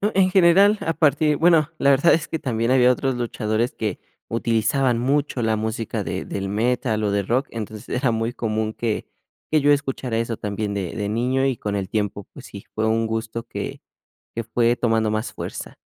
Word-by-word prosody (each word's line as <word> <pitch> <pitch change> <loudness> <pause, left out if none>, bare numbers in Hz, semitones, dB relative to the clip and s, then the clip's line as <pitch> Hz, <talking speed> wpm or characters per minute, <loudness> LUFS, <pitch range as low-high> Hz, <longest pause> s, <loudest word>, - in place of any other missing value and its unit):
En 185 -1 +4
general, 195 +3 +5
a 165 - -1
partir 150 -1 +2
bueno 165 -3 +4
la 140 - +4
verdad 140 +5 +5
es 165 - -3
que 160 - -3
también 115 -1 -1
había 125 -1 +5
otros 135 +1 0
luchadores 115 -1 -1
que 105 -4 -3 0.3
utilizaban 115 +2 +1
mucho 135 0 0
la 110 0 +2
música 110 0 -3
de - - -4
del 95 -1 -4
metal 110 0 0
o 100 - +1
de 100 0 +1
rock, 125 +8 0
entonces 110 -1 -7
era 125 0 0
muy 115 +1 -1
común 110 -1 -2
que 115 -3 -2 0.5
que 155 -2 +4
yo 145 +1 +4
escuchara 135 -4 0
eso 115 -1 -2
también 105 0 -3
de 95 -4 -4
de 105 -1 -2
niño, 125 +5 0
y 135 -2 +1
con 105 -2 -3
el 95 -2 -2
tiempo, 105 -1 -2
pues - - -11
sí, - - -10
fue 110 0 0
un 115 +1 +1
gusto 110 +1 -3
que - - -6 0.5
que 115 - -2
fue 120 +1 +2
tomando 110 -2 +1
más 110 +2 -2
fuerza. - - -7
115 Hz, 195 wpm, -22 LUFS, 110-135 Hz, 0.5 s, general